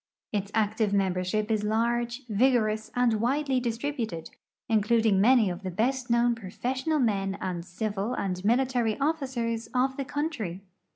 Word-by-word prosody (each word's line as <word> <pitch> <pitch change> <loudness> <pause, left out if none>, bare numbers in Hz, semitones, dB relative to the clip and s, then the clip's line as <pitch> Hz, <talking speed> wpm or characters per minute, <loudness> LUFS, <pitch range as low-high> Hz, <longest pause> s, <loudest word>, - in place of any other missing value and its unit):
Its 200 -2 -2
active 215 -1 +1
membership 195 +2 0
is 215 -1 +1
large, 235 +4 0
vigor 235 +1 +3
ous, 215 0 -4
and 235 -3 +2
widely 270 +2 +1
distributed, 230 - -3 0.4
including 220 -2 +3
many 235 0 +5
of 180 +1 -4
the 190 - -4
best 245 +7 -1
known 235 0 +3
profes 235 +5 -4
sional 315 -2 +2
men 195 -5 0
and 175 -2 -3
civil 205 +5 -3
and 185 -1 -3
military 240 0 +1
officers 260 -7 -1
of 260 +1 +1
the 275 - -2
country. 255 - -3
225 Hz, 150 wpm, -27 LUFS, 200-250 Hz, 0.4 s, many